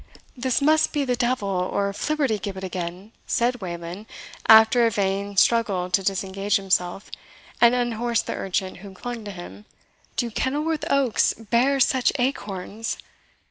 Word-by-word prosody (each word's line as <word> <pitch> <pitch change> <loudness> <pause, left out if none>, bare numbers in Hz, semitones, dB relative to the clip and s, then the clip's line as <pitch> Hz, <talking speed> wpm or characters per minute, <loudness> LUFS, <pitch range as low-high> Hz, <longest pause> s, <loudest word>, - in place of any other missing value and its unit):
"This 255 +1 0
must 310 +2 +3
be 290 -2 0
the 250 -1 0
devil, 240 -3 0
or 195 +1 -1
Flibbertigibbet 215 -9 -2
again!" 185 +2 -5 0.2
said 240 0 0
Wayland, 175 +3 -6 0.4
after 220 +2 +7
a - - +3
vain 200 -1 -2
struggle 195 -5 +2
to 195 - +3
disengage 195 +1 -1
himself, 190 -1 0 0.5
and 235 +1 +6
unhorse 240 -1 0
the - - -4
urchin 190 0 -3
who 190 +1 -11
clung 240 +3 -6
to 205 - -5
him; 190 +3 -10 0.5
"do 240 -3 -1
Kenilworth 295 +7 -1
oaks 275 -5 +2
bear 240 +5 +1
such 260 -1 +3
acorns?" 225 -4 -3
215 Hz, 140 wpm, -24 LUFS, 195-245 Hz, 0.5 s, after